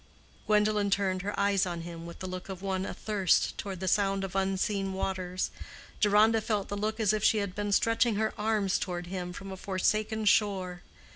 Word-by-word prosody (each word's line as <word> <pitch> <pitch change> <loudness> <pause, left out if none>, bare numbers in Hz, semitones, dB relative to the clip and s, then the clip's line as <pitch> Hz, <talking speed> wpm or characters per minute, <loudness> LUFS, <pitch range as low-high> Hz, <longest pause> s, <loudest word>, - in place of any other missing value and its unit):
Gwendolen 210 -1 +3
turned 190 -2 +1
her 205 +2 -3
eyes 200 -1 +3
on 170 -1 -4
him 170 0 -8
with 170 - -9
the 185 - -7
look 185 +1 -6
of 190 0 -7
one 190 -1 -1
athirst 200 -5 +1
toward 195 -3 -5
the 190 - -3
sound 195 0 +2
of 195 -1 -5
unseen 195 0 0
waters. 185 -1 -2 0.5
Deronda 215 +2 +4
felt 210 -3 -1
the 205 - -2
look 215 +2 -2
as 215 -2 +3
if 215 -1 -1
she 220 - +4
had 200 -3 -2
been 205 +1 -2
stretching 230 +2 +3
her 220 +1 0
arms 210 -3 +1
toward 175 -2 -3
him 180 0 -4
from 195 +2 -8
a 190 - -6
forsaken 215 +3 0
shore. 190 -4 +2
195 Hz, 195 wpm, -29 LUFS, 185-210 Hz, 0.5 s, Deronda